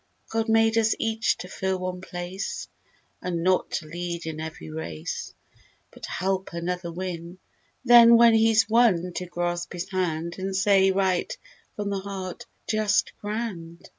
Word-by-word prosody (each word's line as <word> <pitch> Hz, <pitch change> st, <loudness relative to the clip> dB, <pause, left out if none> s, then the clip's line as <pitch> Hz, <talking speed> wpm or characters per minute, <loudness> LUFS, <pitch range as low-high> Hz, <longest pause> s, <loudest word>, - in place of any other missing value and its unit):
God 225 Hz, 0 st, -1 dB
made 225 Hz, 0 st, +4 dB
us 220 Hz, -1 st, +2 dB
each 225 Hz, 0 st, 0 dB
to 180 Hz, -, -7 dB
fill 190 Hz, 0 st, -2 dB
one 185 Hz, 0 st, -4 dB
place. 180 Hz, +1 st, -5 dB, 0.5 s
And 170 Hz, -2 st, -2 dB
not 185 Hz, 0 st, +2 dB
to 155 Hz, -, -2 dB
lead 170 Hz, +1 st, -5 dB
in 160 Hz, -1 st, -5 dB
every 155 Hz, -, -7 dB
race; 80 Hz, 0 st, -5 dB, 0.6 s
But -, -, -9 dB
help 190 Hz, -1 st, -2 dB
another 170 Hz, 0 st, -3 dB
win. 175 Hz, 0 st, -6 dB, 0.5 s
Then, 235 Hz, -1 st, +9 dB
when 235 Hz, 0 st, +7 dB
he's 225 Hz, -1 st, +4 dB
won, 210 Hz, -6 st, +3 dB
to 180 Hz, -, -4 dB
grasp 175 Hz, 0 st, -3 dB
his 175 Hz, 0 st, -4 dB
hand 170 Hz, -2 st, -2 dB
And 190 Hz, 0 st, -3 dB
say, 195 Hz, -1 st, +4 dB
right 190 Hz, -, 0 dB, 0.4 s
from 205 Hz, -1 st, -3 dB
the 200 Hz, -, -1 dB
heart, 190 Hz, -2 st, -6 dB, 0.2 s
"Just 215 Hz, -2 st, +1 dB
grand!" 205 Hz, -6 st, -5 dB
185 Hz, 150 wpm, -25 LUFS, 175-215 Hz, 0.6 s, Then